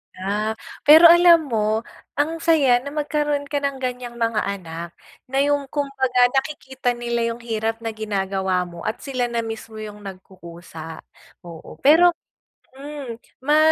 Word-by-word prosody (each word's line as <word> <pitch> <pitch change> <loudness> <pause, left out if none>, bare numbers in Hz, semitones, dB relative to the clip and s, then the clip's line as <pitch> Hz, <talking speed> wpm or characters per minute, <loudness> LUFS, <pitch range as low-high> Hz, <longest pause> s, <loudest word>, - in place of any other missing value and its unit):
Ah. 210 +3 -2 0.3
Pero 325 +3 +10
alam 340 -4 +5
mo, 220 0 0 0.3
ang 320 +3 -1
saya 290 -7 +4
na 265 - -10
magkaroon 295 0 -1
ka 285 - +1
ng 275 -2 -3
ganyang 250 -1 -4
mga 230 -3 -1
anak. 170 -3 -6 0.3
Na 270 +2 +1
yung 285 -1 0
kumbaga 265 -3 +1
nakikita 265 -3 -2
nila 235 0 -2 0.2
yung 240 - -15
hirap 225 0 -3
na 225 - -2
ginagawa 195 -3 -1
mo 175 -1 -10
at 220 - -4
sila 255 -3 -2
na 235 -1 -2
mismo 225 0 -7
yung 210 -1 -8
nagkukusa, 175 -4 -10 0.4
oo. 170 -2 -11
Pero, 340 +5 +6 0.6
hmm, 280 -4 -7 0.2
ma 295 +3 +3
240 Hz, 145 wpm, -22 LUFS, 210-285 Hz, 0.6 s, Pero